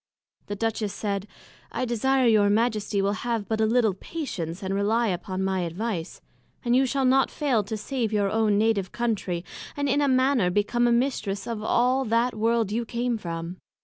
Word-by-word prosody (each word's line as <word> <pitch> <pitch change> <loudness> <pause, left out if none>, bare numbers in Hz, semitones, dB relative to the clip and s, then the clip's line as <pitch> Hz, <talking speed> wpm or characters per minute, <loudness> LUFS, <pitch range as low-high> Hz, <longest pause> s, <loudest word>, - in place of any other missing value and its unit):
The 205 - -3
Duchess 220 -1 -1
said, 200 -1 -3 0.4
I 255 - -2
desire 255 +3 +1
your 215 -3 +4
Majesty 210 -2 +1
will 200 - +2
have 230 -4 -2
but 220 0 -1
a 220 - +3
little 225 -3 +3
patience, 190 - -5
and 190 0 -2
relie 210 +1 +1
upon 185 +2 -4
my 190 0 0
advice, 180 0 -4 0.4
and 240 0 +3
you 265 +1 +4
shall 270 +1 0
not 265 +1 +4
fail 265 -8 0
to 220 +1 -4
save 230 +1 -2
your 205 -2 +1
own 215 -2 +2
Native 210 -3 +1
Country, 200 -7 -2 0.3
and 285 0 0
in 280 +2 +2
a 285 - +3
manner 260 -6 +3
become 225 +6 +1
a - - +3
Mistress 235 -6 0
of 230 -2 -4
all 250 +4 +2
that 230 +2 +1
World 225 -1 +1
you 235 +3 0
came 235 0 -2
from. 170 0 -5
220 Hz, 185 wpm, -26 LUFS, 200-240 Hz, 0.4 s, your